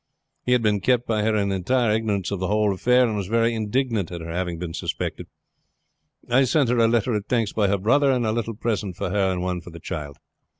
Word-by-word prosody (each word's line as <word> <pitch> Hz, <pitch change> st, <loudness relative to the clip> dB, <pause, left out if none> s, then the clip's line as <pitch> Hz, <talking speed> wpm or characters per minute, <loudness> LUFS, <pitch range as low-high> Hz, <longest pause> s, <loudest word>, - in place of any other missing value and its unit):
He 125 Hz, -, +2 dB
had 125 Hz, -2 st, +2 dB
been 105 Hz, -1 st, +2 dB
kept 120 Hz, +4 st, +1 dB
by 110 Hz, -2 st, 0 dB
her 110 Hz, +1 st, +1 dB
in 100 Hz, -1 st, +1 dB
entire 110 Hz, +5 st, +1 dB
ignorance 105 Hz, -4 st, -1 dB
of 100 Hz, -, -2 dB
the 95 Hz, -, -1 dB
whole 105 Hz, 0 st, +2 dB
affair, 125 Hz, +6 st, +3 dB
and 110 Hz, -3 st, -1 dB
was 100 Hz, -3 st, -3 dB
very 115 Hz, +2 st, +2 dB
indignant 110 Hz, -3 st, -1 dB
at 85 Hz, -, -5 dB
her 80 Hz, 0 st, -6 dB
having 90 Hz, -1 st, -2 dB
been 85 Hz, -1 st, -5 dB
suspected. -, -, -4 dB, 1.0 s
I 130 Hz, +3 st, +4 dB
sent 130 Hz, 0 st, +2 dB
her 125 Hz, 0 st, +2 dB
a 115 Hz, -, +5 dB
letter 115 Hz, +1 st, +1 dB
of 105 Hz, -1 st, -2 dB
thanks 115 Hz, -4 st, 0 dB
by 105 Hz, -2 st, +2 dB
her 100 Hz, +1 st, +1 dB
brother, 135 Hz, +8 st, +3 dB
and 125 Hz, -3 st, +1 dB
a 110 Hz, -, +1 dB
little 115 Hz, 0 st, -2 dB
present 105 Hz, -4 st, -2 dB
for 90 Hz, -, -3 dB
her 95 Hz, -2 st, +1 dB
and 90 Hz, -1 st, -2 dB
one 90 Hz, -1 st, -2 dB
for 85 Hz, -, -11 dB
the 85 Hz, 0 st, -10 dB
child. 75 Hz, -5 st, -6 dB
105 Hz, 245 wpm, -23 LUFS, 95-120 Hz, 1.0 s, a